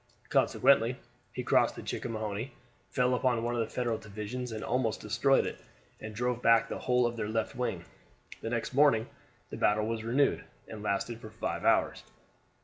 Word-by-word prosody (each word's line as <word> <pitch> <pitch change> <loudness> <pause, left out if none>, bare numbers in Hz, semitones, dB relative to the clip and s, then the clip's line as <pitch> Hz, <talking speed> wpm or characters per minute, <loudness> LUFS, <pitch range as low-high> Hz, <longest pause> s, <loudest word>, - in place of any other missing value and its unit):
Consequently 125 -2 +3 0.4
he - - -4
crossed - - +3
the - - -8
Chickahominy, 110 +1 -4 0.4
fell 125 +4 +2
upon 125 -2 +1
one 120 +1 -1
of 120 - -1
the 110 - -3
Federal 120 -3 -1
divisions 110 +4 -6
and 110 -1 -5
almost 115 -4 0
destroyed 125 +5 +2
it, - - -5 0.4
and 110 0 -8
drove 125 +1 -1
back 115 -1 +5
the - - -5
whole 125 -1 +2
of 120 0 -1
their 105 -2 -2
left 110 0 -2
wing. 115 -9 -2 0.6
The 115 - -3
next 115 +1 -2
morning 135 -5 +4 0.5
the - - -5
battle 105 +1 +2
was 110 0 -3
renewed, 130 +5 +2 0.2
and 110 - -8
lasted 105 +3 -2
for 110 - -9
five 110 +1 -4
hours. - - +3
115 Hz, 175 wpm, -30 LUFS, 110-125 Hz, 0.6 s, back